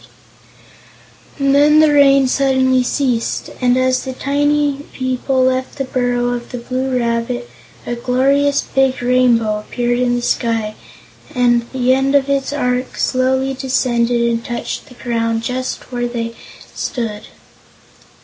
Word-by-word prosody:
And 275 -1 +2
then 295 +2 +5
the 310 -1 +5
rain 275 -2 +5
suddenly 260 -1 +2
ceased, 250 -2 -1
and 250 0 +3
as 255 0 +1
the 260 - -5
tiny 290 +1 0
people 260 0 -1
left 260 0 -1
the 275 - -1
burrow 245 -2 -1
of 240 -1 -4
the 250 - -4
Blue 255 +2 -2
Rabbit, 235 +1 -2 0.4
a - - -3
glorious 275 +4 +1
big 270 -1 0
Rainbow 240 -4 +2
appeared 240 +3 -2
in 245 -1 +1
the 240 - -3
sky 225 -3 -1 0.6
and 240 -1 +2
the 255 -1 +2
end 270 +1 +1
of 280 0 +2
its 275 0 0
arch 250 -3 -1
slowly 260 +1 +1
descended 245 -3 0
and 230 0 -1
touched 240 0 -5
the 250 - -15
ground 230 -2 -2
just 255 +2 -4
where 245 -1 -2
they 230 -1 -4 0.4
stood. 225 -4 -4
255 Hz, 140 wpm, -17 LUFS, 240-270 Hz, 0.6 s, then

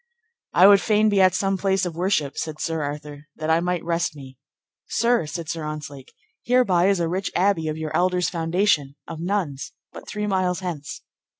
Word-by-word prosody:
I 180 - +6
would 200 0 +7
fain 215 0 +3
be 200 -2 +3
at 185 -1 +5
some 195 -1 0
place 190 -1 +1
of 170 -2 -4
worship, 170 -6 0
said 155 -1 -4
Sir 165 -1 -2
Arthur, 145 0 -6
that 155 0 -2
I 165 - +4
might 180 0 -1
rest 170 -2 -1
me. 135 -2 -12 0.5
Sir, 235 -8 +1
said 165 +1 -6
Sir 165 +1 -4
Ontzlake, 145 -3 -7 0.3
hereby 210 -8 +3
is 195 -2 +2
a 170 - 0
rich 185 +4 -2
abbey 180 -4 +2
of 155 0 -3
your 160 -1 -4
elders' 180 0 +2
foundation, 165 -4 0
of 160 -1 -7
nuns, 170 -6 -3 0.2
but - - -11
three 210 -1 -3
miles 185 -2 0
hence. 160 -6 -6
175 Hz, 190 wpm, -23 LUFS, 155-195 Hz, 0.5 s, would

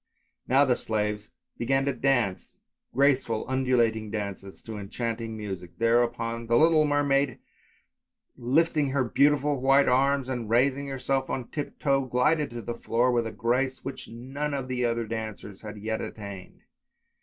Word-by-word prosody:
" - - -47
Now 135 +3 +5
the 125 -2 +3
slaves 105 -2 -2 0.3
began 135 +3 +1
to 140 - +1
dance, 120 -6 0 0.4
graceful 130 -4 +2
undulating 120 -4 +1
dances 100 -2 -6
to 110 -2 -6
enchanting 115 +2 -4
music; 95 -5 -7
there 115 +1 +4
upon 115 -1 -3
the 120 +1 +4
little 155 0 +5
mermaid 140 -3 +2 1.0
lifting 145 +4 +2
her 135 0 +1
beautiful 140 +2 +2
white 135 +1 +5
arms 135 +1 +2
and 120 -4 -4
raising 135 +4 +2
herself 135 0 -1
on 125 -3 -3
tiptoe 140 -2 -1
glided 145 +4 +2
on 115 - -7
the 120 - -2
floor 120 +2 +1
with 120 -2 +1
a - - -5
grace 130 +4 -1
which 135 - -6
none 135 +5 -4
of 135 -2 -3
the 125 -1 -2
other 115 -1 0
dancers 110 -3 -6
had 105 0 -8
yet 110 +1 -3
attained. 100 -3 -8
125 Hz, 155 wpm, -27 LUFS, 115-135 Hz, 1.0 s, Now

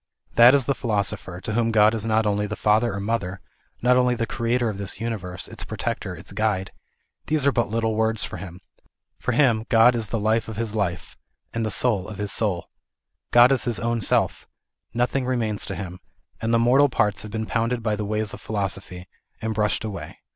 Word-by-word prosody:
That 120 +3 +8
is 135 -3 +2
the 140 - +1
philosoper, 100 -7 -2
to 110 - -3
whom 115 0 +1
God 110 -1 +5
is 115 -1 0
not 110 0 +2
only 105 0 0
the 105 - -4
Father 110 +3 +2
or - - -3
Mother, 100 -3 -2 0.4
not 125 0 +5
only 125 -1 +3
the 115 - -1
Greater 120 +2 0
of 105 -3 -4
this 100 0 -2
Uni 115 0 -2
verse, 90 -2 -6
its - - -7
Protector, - - -4
its - - -10
Guide; 100 -2 -1 0.6
these 150 -3 +1
are 140 - +5
but 120 -5 0
little 110 0 0
words 110 0 +1
for - - -5
him. 90 0 -9 0.6
For - - -1
him 120 -7 +3
God 115 +2 +6
is 115 -3 -2
the 115 - -2
life 110 +2 +1
of 110 - -6
his 115 -2 -2
life, 95 -5 -3 0.4
and 115 -1 -1
soul 105 -4 +2
of 105 - -8
his 105 -1 -2
soul. 95 -6 0 0.6
God 120 +2 +7
is 135 -2 +2
his 120 -4 0
own 115 0 -1
Self. - - 0 0.4
Nothing 125 +3 0
remains 115 -5 -1
to - - -4
him. 90 -2 -7 0.4
All 115 - -1
the 115 - +4
mortal 130 +5 +4
parts 105 -5 +1
have 110 - -8
been 110 +1 -3
pounded 115 +1 -1
by 110 -2 +1
the 105 - -4
ways 105 +1 -2
of - - -9
phi 110 - -6
losophy, 95 -2 -3 0.3
and 110 0 -2
brushed 105 0 0
away. 105 -3 -6
110 Hz, 210 wpm, -24 LUFS, 105-115 Hz, 0.6 s, That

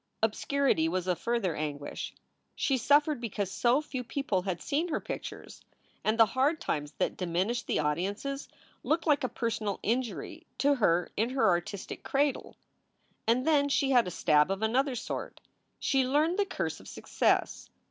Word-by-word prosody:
Obscurity 220 - +2
was 180 +1 -1
a 180 -1 +1
further 225 -5 -1
anguish. 145 -1 -5 0.4
She 270 - +1
suffered 290 +2 +3
because 205 -4 -3
so 245 +8 +2
few 260 -4 -5
people 245 -6 -1
had 180 -2 -3
seen 305 - -1
her 320 - -1
pictures, - - -7 0.4
and 215 +1 +1
the 225 - +9
hard 270 +8 +1
times 150 - -3
that - - -1
diminished 185 +6 -1
the - - +1
audiences 200 - -2 0.3
looked 325 +2 0
like 295 -4 +3
a 255 - 0
personal 220 -4 -2
injury 240 +2 -2
to 285 +1 +3
her 180 -9 +2
in 225 +3 +1
her 265 +1 +2
artistic 180 +2 -1
cradle. 280 0 0 0.7
And 245 +3 +3
then 290 -3 +3
she 275 -1 +2
had 245 -6 +5
a - - -1
stab 150 -2 +3
of 195 +2 -2
another 255 +4 +1
sort. - - -5 0.4
She 270 -2 +2
learned 305 +8 +2
the 405 - +2
curse - - -3
of - - -14
success. - - 0
235 Hz, 165 wpm, -30 LUFS, 185-280 Hz, 0.7 s, the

